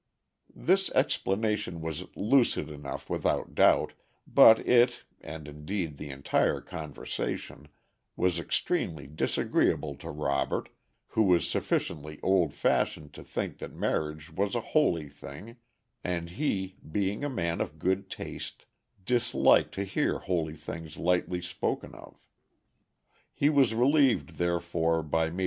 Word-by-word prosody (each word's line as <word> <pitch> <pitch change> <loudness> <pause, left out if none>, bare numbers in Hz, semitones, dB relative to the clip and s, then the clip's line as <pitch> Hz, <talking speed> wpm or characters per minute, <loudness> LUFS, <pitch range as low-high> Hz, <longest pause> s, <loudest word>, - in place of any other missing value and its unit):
This - - +2
explanation 100 -3 0
was 80 -2 -4
lucid 120 -3 +2
enough 75 -2 -7
without - - -1
doubt, - - +4 0.3
but 110 - +8
it, 120 0 +4 0.2
and 80 -2 -8
indeed 75 +1 -4
the 75 0 -7
entire 70 0 +1
conversation, 75 -1 -5 0.5
was 90 -2 +1
extremely 80 -3 -1
disagreeable 75 +1 0
to - - -8
Robert, 70 -2 -1 0.4
who 110 - +1
was 90 -5 +4
sufficiently 75 -2 -2
old 95 -5 +3
fashioned 75 +1 0
to - - -10
think - - -4
that - - -7
marriage 75 0 -2
was 100 +3 0
a - - +2
holy 85 - +3
thing, 75 - -11 0.5
and 85 -1 -3
he, 95 -7 -2
being 100 - -1
a 145 - 0
man 85 -10 -1
of - - -4
good 95 +2 0
taste, - - -7 0.4
disliked 125 +1 +3
to 100 - -1
hear 100 - 0
holy 80 -4 -2
things 80 0 -8
lightly 90 0 0
spoken 90 +1 -3
of. - - -13 1.2
He 145 +2 +3
was 135 -6 +4
relieved, 125 - +3
therefore, 85 -1 +1
by 80 +2 +1
Maj. 85 +3 -6
85 Hz, 125 wpm, -29 LUFS, 75-100 Hz, 1.2 s, but